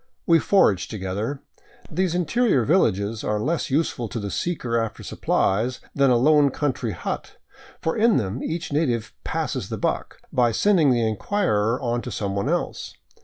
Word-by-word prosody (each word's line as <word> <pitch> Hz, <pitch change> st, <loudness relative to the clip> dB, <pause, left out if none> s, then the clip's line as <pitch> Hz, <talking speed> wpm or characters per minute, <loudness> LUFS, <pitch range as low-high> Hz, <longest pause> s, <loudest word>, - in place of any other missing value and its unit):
We 165 Hz, -1 st, +5 dB
foraged 150 Hz, -, +3 dB
together. 105 Hz, +7 st, -4 dB, 0.5 s
These 175 Hz, +1 st, 0 dB
interior 180 Hz, -, +2 dB
villages 110 Hz, -, +1 dB
are 105 Hz, 0 st, 0 dB
less 155 Hz, +9 st, -1 dB
useful 135 Hz, -4 st, 0 dB
to 115 Hz, -, -5 dB
the 100 Hz, -2 st, -4 dB
seeker 140 Hz, -9 st, -2 dB
after 115 Hz, -1 st, -2 dB
supplies 115 Hz, +6 st, 0 dB
than 140 Hz, -1 st, +3 dB
a 125 Hz, -, +4 dB
lone 145 Hz, +3 st, +5 dB
country 130 Hz, -5 st, -2 dB
hut, -, -, -5 dB, 0.4 s
for 160 Hz, -, -1 dB
in 225 Hz, 0 st, +4 dB
them 105 Hz, +2 st, -2 dB
each 160 Hz, -2 st, -4 dB
native 125 Hz, -8 st, 0 dB
" -, -, -50 dB
passes -, -, -3 dB
the -, -, -3 dB
buck -, -, -2 dB
" -, -, -31 dB
by 120 Hz, -2 st, +3 dB
sending 175 Hz, -, +4 dB
the 120 Hz, -3 st, +2 dB
inquirer 110 Hz, -, 0 dB
on 120 Hz, -1 st, -1 dB
to 125 Hz, -, -6 dB
someone 100 Hz, -3 st, -2 dB
else. -, -, -2 dB
125 Hz, 170 wpm, -23 LUFS, 110-160 Hz, 0.5 s, We